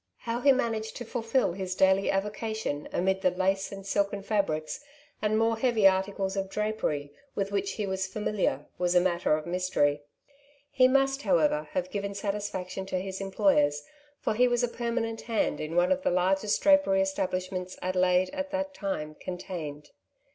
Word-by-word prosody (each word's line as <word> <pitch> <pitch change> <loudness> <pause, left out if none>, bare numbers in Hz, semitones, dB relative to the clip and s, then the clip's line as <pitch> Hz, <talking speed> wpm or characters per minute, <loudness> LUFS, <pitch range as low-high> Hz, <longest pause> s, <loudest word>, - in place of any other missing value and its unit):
How 235 +1 -2
he 275 - +6
managed 225 -4 -1
to 240 - -6
fulfil 230 -1 0
his 185 0 -4
daily 190 +1 +3
avocation 210 -5 -2
amid 190 +2 +1
the 185 - +4
lace 190 +2 0
and 195 -1 -8
silken 200 0 0
fabrics, 195 - -1 0.4
and 215 0 +1
more 225 0 +2
heavy 225 -5 +4
articles 190 0 0
of 195 -1 -2
drapery, 195 -9 -2 0.2
with 200 0 -1
which 200 -1 -1
he 210 - -2
was 190 0 -2
familiar, 210 -1 -1
was 180 0 +1
a - - +8
matter 175 -3 +2
of 155 - -7
mystery. 170 -5 +1 0.7
He 255 -1 +5
must, 270 +1 +2
how 190 -5 +3
ever, 150 -1 +1
have 185 0 -2
given 200 -1 -3
satisfaction 195 -2 -3
to 185 - -1
his 190 +1 -5
employers, 190 -7 +2 0.4
for - - 0
he 250 +3 +4
was 245 0 +1
a - - +3
permanent 235 -1 -2
hand 225 -9 -1
in 155 +2 -4
one 175 +1 +3
of 280 0 +2
the - - +1
largest 190 +3 +2
drapery 290 -10 +5
establishments 185 -1 -2
Adelaide 185 0 +2
at 285 0 -3
that 285 0 -2
time 175 - -3
contained. 160 -5 -6
195 Hz, 170 wpm, -28 LUFS, 180-220 Hz, 0.7 s, a